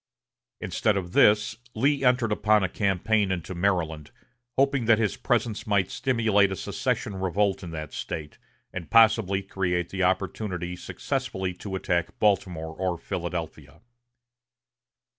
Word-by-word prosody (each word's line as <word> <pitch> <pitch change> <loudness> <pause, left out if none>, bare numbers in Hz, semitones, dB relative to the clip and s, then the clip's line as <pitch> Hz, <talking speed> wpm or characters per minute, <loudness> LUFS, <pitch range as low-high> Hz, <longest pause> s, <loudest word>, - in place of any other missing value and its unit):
Instead 105 -2 0
of 90 -2 -5
this, 105 +1 +4 0.2
Lee 135 +5 +1
entered 125 -3 +3
upon 105 0 +3
a - - +2
campaign 100 +2 +1
into 95 0 -3
Maryland, 85 -5 -1 0.5
hoping 135 -2 +2
that 115 -1 +5
his 105 -3 0
presence 115 -4 -1
might 100 -3 +1
stimulate 110 -7 +2
a - - -2
secession 95 +2 -2
revolt 95 +1 0
in 85 - -6
that 75 -2 -6
State, 75 -2 -6 0.3
and 90 -3 -6
possibly 110 -4 +4
create 90 -3 -1
the 95 - -4
opportunity 90 -1 -1
successfully 95 0 -3
to 95 +2 -6
attack 90 -2 -1
Baltimore 90 -6 0
or 90 -1 -1
Philadelphia. 85 -4 -5
95 Hz, 130 wpm, -26 LUFS, 90-110 Hz, 0.5 s, that